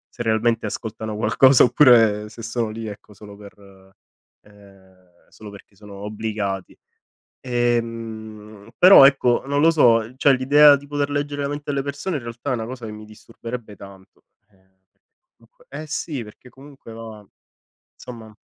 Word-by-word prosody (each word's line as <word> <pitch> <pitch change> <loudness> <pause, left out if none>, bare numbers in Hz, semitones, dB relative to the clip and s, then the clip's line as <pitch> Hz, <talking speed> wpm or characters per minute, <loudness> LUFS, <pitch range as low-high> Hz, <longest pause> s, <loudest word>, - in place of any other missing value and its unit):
se 120 - -5
realmente 115 0 0
ascoltano 110 0 -6
qualcosa 130 +3 +4
oppure 115 -5 +4
se 115 - -12
sono 115 -1 -3
lì, 110 0 -7
ecco, 105 0 -11
solo 105 0 -14
per 100 0 -14 0.9
ehm, 95 -3 -23
solo 105 -1 -13
perché 100 0 -16
sono 100 0 -14
obbligati. 105 -2 -5 0.6
Ehm, 115 -3 -4
però 185 -6 +8
ecco, 130 -3 +2
non 145 +1 0
lo 165 +1 +5
so, 115 -6 +2
cioè 140 0 +4
l'idea 145 +3 +5
di 140 +1 -10
poter 145 0 -3
leggere 145 0 -3
la - - -2
mente 145 0 -7
alle 140 -1 -2
persone 145 +4 -5
in 125 - -9
realtà 120 +4 -6
è - - 0
una 110 -1 -5
cosa 125 -1 -9
che 110 - -7
mi 105 0 -11
disturberebbe 115 0 -10
tanto. 95 -1 -16 0.3
Ehm, 95 -2 -31 0.3
perché 350 - -56
comunque - - -26
eh 155 - -8
sì, 145 -4 -5
perché 105 +4 -16
comunque 135 -2 -15
va 110 -2 -11 0.7
somma 115 -3 -12
115 Hz, 160 wpm, -21 LUFS, 105-135 Hz, 0.9 s, però